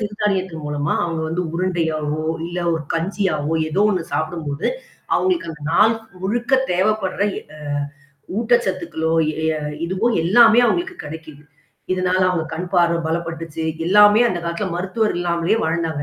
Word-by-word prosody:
சிறு 210 -1 -3
தானியத்தின் 190 -5 -1
மூலமா 145 0 -1
அவங்க 165 -2 -2
வந்து 175 +3 -1
உருண்டையாவோ 160 -4 -1 0.2
இல்ல 175 +1 -5 0.2
ஒரு 160 - -3
கஞ்சியாவோ, 165 -3 -1 0.2
ஏதோ 185 +6 +1
ஒண்ணு 185 -4 0
சாப்பிடும்போது, 155 -3 -2 0.5
அவங்களுக்கு 365 - +1
அந்த 150 -2 -11
நாள் 215 +6 +5 0.3
முழுக்க 240 +7 -2 0.2
தேவைப்படுற 190 +1 0 0.2
எ - - -9
அ - - -12 0.8
ஊட்டச்சத்துக்களோ, 185 -9 0 0.3
எ - - +2 0.4
இதுவோ 190 +6 0 0.2
எல்லாமே 230 +5 +6
அவங்களுக்கு 355 +9 -1
கிடைக்குது. 155 -1 -9 0.5
இதனால 185 0 +1
அவங்க 170 -3 -1
கண் 180 +3 -4
பார்வ 170 -1 +3
பலப்பட்டுச்சு, 165 -1 -4 0.3
எல்லாமே 210 +3 +7
அந்த 175 - -2
காலத்தில 170 +4 -2
மருத்துவர் 200 +4 0
இல்லாமலேயே 175 +4 +1
வாழ்ந்தாங்க. 160 -2 -1
175 Hz, 135 wpm, -20 LUFS, 160-205 Hz, 0.8 s, எல்லாமே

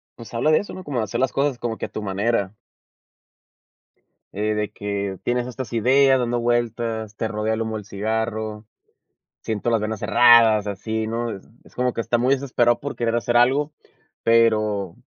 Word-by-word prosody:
pues 115 0 -12
habla 130 +7 +2
de 155 - +5
eso, 205 - -7
¿no?, 185 - -8
como 140 -6 -3
de - - 0
hacer 115 +3 -4
las 130 0 +1
cosas 140 -2 0
como 115 -2 -3
que - - -4
a - - -25
tu 110 - -6
manera. 100 0 -1 1.8
Eh, 105 +1 -1
de 105 -1 -2
que 100 -2 -4
tienes 125 0 -1
estas 125 0 -6
ideas 130 +3 +4
dando 120 -1 0
vueltas, 115 -2 -1
te 110 - -2
rodea 110 +1 -1
el 110 - -2
humo 110 -1 -3
del 105 - -9
cigarro, 110 +1 -3 0.8
siento 110 +1 -2
las 115 -2 +1
venas 110 -1 -3
cerradas, 115 -3 +5
así, 110 +2 -3
¿no?, 115 +1 -2
es 95 - -10 0.2
es - - -20
como 125 0 +1
que - - -5
está 115 +1 0
muy 130 +3 +3
desesperado 120 -3 +1
por 145 - -5
querer 115 -1 -1
hacer 120 +1 -1
algo, 135 +5 +3 0.5
pero 110 -5 +2
115 Hz, 185 wpm, -22 LUFS, 105-120 Hz, 1.8 s, de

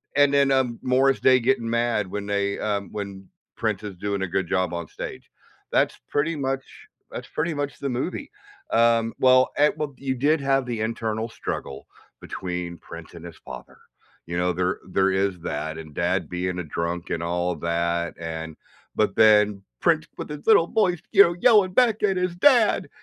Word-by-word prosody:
and 145 -1 +4
then, 140 -1 +4
um, 125 -3 +1
Morris 130 +1 +2
Day 130 -1 +5
getting 115 -2 0
mad 115 -4 0
when 100 +2 -5
they, 100 0 -1
um, 100 -2 -2
when 100 -2 -7 0.3
Prince 110 -2 -2
is 100 -3 -6
doing 100 +1 -2
a - - -1
good 95 0 -1
job 95 -1 0
on 85 -2 -4
stage. - - -8 0.4
That's - - +1
pretty 155 +3 0
much 135 -1 -2 0.5
that's - - -7
pretty 165 +1 -2
much 145 -1 -4
the 140 - -3
movie. 155 - -4 0.4
Um, 115 -1 +3
well 130 0 +5
at 150 +1 +3
well, 150 -2 -3
you 135 -1 -2
did 145 +4 +2
have 135 -1 +1
the 115 -3 -4
internal 110 0 -2
struggle 70 - -6 0.3
between 90 -2 -5
Prince 85 0 -11
and 85 0 -11
his 85 -3 -10
father, - - -11 0.5
you 85 +1 -4
know? 90 +1 +1
There 90 +1 -1
there 95 +1 +2
is 95 -1 0
that 80 0 -4
and 80 -2 -10
dad 85 0 0
being 90 0 -3
a - - -3
drunk 85 +3 -4
and 85 - -2
all 90 +1 -1
of 80 - -7
that, 85 0 -1
and 80 -1 -6 0.4
but - - +1
then 105 -2 +5 0.2
Prince - - +2
with - - -6
his 150 -1 -8
little 205 -7 +6
voice, 180 -5 +1
you 200 0 +9
know, 170 0 0
yelling 205 -4 +5
back 230 -4 +3
at 195 -2 +2
his 180 -1 -1
dad. 240 +1 +4
110 Hz, 190 wpm, -24 LUFS, 90-140 Hz, 0.5 s, you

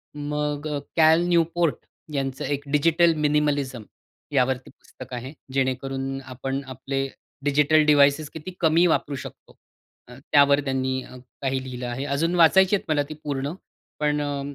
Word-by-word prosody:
मग 150 0 -3 0.3
Cal 160 0 +5
Newport 170 -2 +2 0.4
यांचं 135 -2 -2
एक, 145 -1 -2
डिजिटल 165 +3 +4
मिनिमलिझम, 145 -5 0 0.5
यावरती 130 0 +1
पुस्तक - - -13
आहे. 125 +3 -6 0.2
जेणेकरून 135 0 -2
आपण 135 +1 -4
आपले 135 +1 -3 0.4
डिजिटल 150 +2 +4
डिव्हाइसेस 145 0 +4
किती 160 +3 -7
कमी 165 +1 +4
वापरू 145 -3 0
शकतो. 130 - -10 0.5
अ, 125 - -12 0.2
त्यावर 140 0 +6
त्यांनी 130 -1 -1
अ, - - -13 0.3
काही 135 -1 -1
लिहिलं 125 -1 -6
आहे. 120 +3 -4
अजून 165 +4 0
वाचायची 190 +4 +5
आहेत 195 - -4
मला 150 -2 +2
ती - - -5
पूर्ण. 140 -1 -2 0.5
पण 150 0 +1
अ, 145 -1 -2
145 Hz, 140 wpm, -24 LUFS, 135-155 Hz, 0.5 s, त्यावर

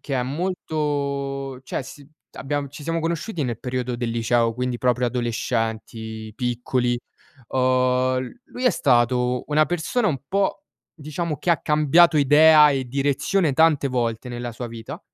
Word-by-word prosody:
che 140 - -4
è 125 - +1
molto 140 -3 -3
cioè 130 - -3
si 135 +2 -12 0.3
abbiam 145 0 -3
ci 145 +2 -11
siamo 165 +1 -1
conosciuti 165 +2 -2
nel 120 -4 -3
periodo 125 -1 -3
del 120 -1 -2
liceo, 115 0 +1
quindi 125 0 -2
proprio 125 0 +1
adolescenti, 115 -2 -3
piccoli. 125 0 -1 0.5
Uhm, 130 0 +2
l 245 - -20
lui 250 - -7
è 250 - +6
stato 125 - +2
una 155 +1 +3
persona 175 +8 0
un 145 -6 -1
po' 195 0 0 0.3
diciamo, 155 +1 -4
che 175 - 0
ha 165 - +3
cambiato 155 +3 +4
idea 150 +1 +7
e 135 -2 -1
direzione 140 +5 +1
tante 155 0 +3
volte 120 -1 -2
nella 120 0 -5
sua 120 +1 -6
vita 115 +7 -8
135 Hz, 150 wpm, -23 LUFS, 125-155 Hz, 0.5 s, idea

